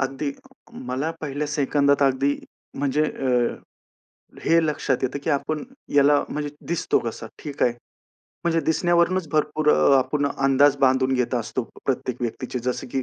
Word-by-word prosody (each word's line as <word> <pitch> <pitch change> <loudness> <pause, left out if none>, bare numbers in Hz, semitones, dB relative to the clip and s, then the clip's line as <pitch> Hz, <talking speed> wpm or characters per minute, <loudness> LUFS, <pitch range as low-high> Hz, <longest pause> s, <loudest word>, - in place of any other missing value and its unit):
अगदी 135 +1 -2 0.6
मला 140 +5 -1
पहिल्या 150 0 -3
सेकंदात 140 -1 +2
अगदी 135 +1 +2 0.4
म्हणजे 145 +2 +1
अ, 125 -5 0 0.9
हे 165 0 +4
लक्षात 145 -3 0
येतं, 130 +2 -1
की 160 - 0
आपण 150 +2 -1 0.3
याला 145 0 +5
म्हणजे 150 0 -3 0.2
दिसतो 170 - +1
कसा? 115 -1 -5 0.2
ठीक 145 -2 -4
आहे. 120 - +4 0.7
म्हणजे 165 -1 +2
दिसण्यावरूनच 175 +1 +2
भरपूर 155 0 +1
अ, 140 - +5
आपण 145 +2 0
अंदाज 135 +1 +3
बांधून 130 0 +3
घेत 125 0 0
असतो 125 +2 -2 0.2
प्रत्येक 125 -2 -1
व्यक्तीचे. 125 +2 -3
जसं 125 +1 -3
की 135 - 0
140 Hz, 145 wpm, -23 LUFS, 130-150 Hz, 0.9 s, याला